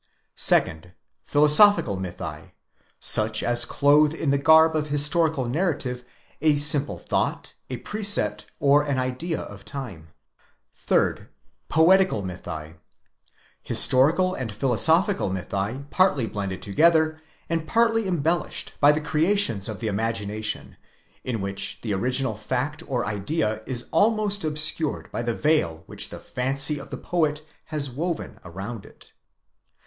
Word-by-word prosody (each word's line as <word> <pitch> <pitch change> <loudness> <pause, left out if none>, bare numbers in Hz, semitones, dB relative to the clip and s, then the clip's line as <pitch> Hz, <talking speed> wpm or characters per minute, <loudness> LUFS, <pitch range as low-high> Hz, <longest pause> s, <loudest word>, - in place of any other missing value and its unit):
2nd. 80 +3 +2 0.3
Philosophical 150 - +4
mythi: 90 -5 -7 0.5
such 110 0 +4
as 120 0 +3
clothe 150 +3 +3
in 155 -4 -1
the 140 - +2
garb 160 +2 +5
of 150 -1 -1
historical 150 0 +2
narrative 135 -4 -2 0.4
a 155 -1 +3
simple 145 0 +3
thought, - - -3 0.2
a 130 - -4
precept, 205 - -1
or 145 +1 +4
an 145 -2 -2
idea 130 +6 -3
of 100 - -10
the 100 - -21
time. 105 - -8 0.8
3rd. - - 0 0.4
Loetical 175 - +3
mythi: 85 -3 -8 0.8
historical 160 +8 +3
and 125 - -5
philosophical 160 - +2
mythi 100 +8 -4
partly 185 -10 +2
blended 100 -3 -5
together, 155 - +2 0.3
and 165 -1 -3
partly 225 -1 +1
embellished 170 -1 -2
by 145 0 +7
the 150 +1 -2
creations 155 - +1
of 110 0 -7
the 115 - -3
imagination, 105 0 -3 0.5
in 115 -5 -4
which 100 0 -3
the 110 -3 -3
original 125 +4 +1
fact 130 +7 -4
or 125 -3 -2
idea 105 +2 -2
is 125 -2 -3
almost 210 -2 +1
obscured 155 0 -1
by - - -4
the 120 -1 -2
veil 100 - 0
which - - -2
the - - -9
fancy 135 +3 +1
of 140 - -11
the - - -6
poet 155 -3 -2 0.2
has 145 -4 -1
woven 165 +5 -5
around 95 +5 -8
it. - - -16
140 Hz, 130 wpm, -23 LUFS, 110-160 Hz, 0.8 s, by